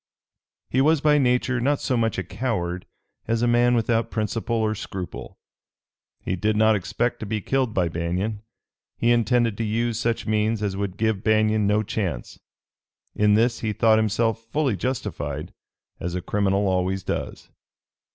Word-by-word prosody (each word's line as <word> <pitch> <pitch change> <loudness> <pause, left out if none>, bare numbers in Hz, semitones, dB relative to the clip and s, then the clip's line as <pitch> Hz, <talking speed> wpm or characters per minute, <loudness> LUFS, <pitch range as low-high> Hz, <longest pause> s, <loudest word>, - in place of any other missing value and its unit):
He 130 - +3
was 155 +2 +4
by 150 0 +4
nature 125 0 +1
not 140 +3 +1
so 130 - -1
much 115 -1 0
a - - -1
coward 90 -8 -3 0.4
as 115 +1 0
a - - +3
man 120 +1 +4
without 115 0 +1
principle 110 +1 -2
or 110 -1 +1
scruple. 95 -4 -7 0.9
He 95 - -1
did 105 +4 0
not 110 0 +5
expect 100 +6 -1
to 110 - -5
be 110 +1 -1
killed 130 +1 -1
by 90 -2 +2
Banion. 90 +6 -2 0.6
He 115 - +2
intended 120 -2 +2
to - - 0
use 115 +1 -1
such 115 0 -1
means 110 0 0
as 100 -2 -1
would 100 -2 -3
give 110 -2 0
Banion 110 -1 +3
no 105 +1 +2
chance. 95 - -4 0.7
In 105 0 +3
this 115 +2 +2
he 110 -2 -2
thought 110 0 +4
himself 115 +1 0
fully 135 0 0
justified, 75 - -4 0.5
as 90 +1 -4
a 90 - -2
criminal 100 -1 +1
always 95 0 0
does. - - -4
110 Hz, 160 wpm, -24 LUFS, 100-120 Hz, 0.9 s, not